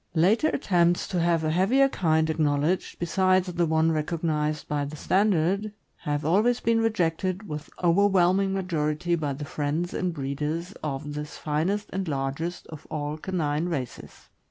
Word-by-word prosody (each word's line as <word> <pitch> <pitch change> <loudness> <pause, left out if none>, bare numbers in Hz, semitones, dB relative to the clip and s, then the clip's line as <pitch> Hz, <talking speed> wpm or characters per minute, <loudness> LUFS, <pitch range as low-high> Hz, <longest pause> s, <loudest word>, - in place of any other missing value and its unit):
Later 200 - +4
attempts 175 - +2
to 180 - -1
have 170 -1 +2
a 155 - +1
heavier 215 +11 +4
kind 160 -9 +1
acknowledged, 155 +2 0
besides 185 +1 +1
the 170 -1 +1
one 160 +1 +2
recognized 155 -1 -1
by 145 -1 -1
the 145 +2 -6
standard, 195 +3 +1 0.2
have 145 0 -3
always 215 +9 +3
been 230 0 +2
rejected 185 -2 0
with 150 -1 -6
overwhelming 190 +1 +3
majority 170 -3 -1
by 150 -4 0
the 145 +2 -6
friends 150 +5 -2
and 180 -1 -1
breeders 150 +4 -3
of 145 0 -4
this 150 0 -6
finest 170 +8 -1
and 190 -1 -2
largest 140 +4 -3
of 155 -2 -11
all 150 -1 -3
canine 155 -2 -1
races. 135 -8 -6
165 Hz, 150 wpm, -26 LUFS, 150-185 Hz, 0.2 s, Later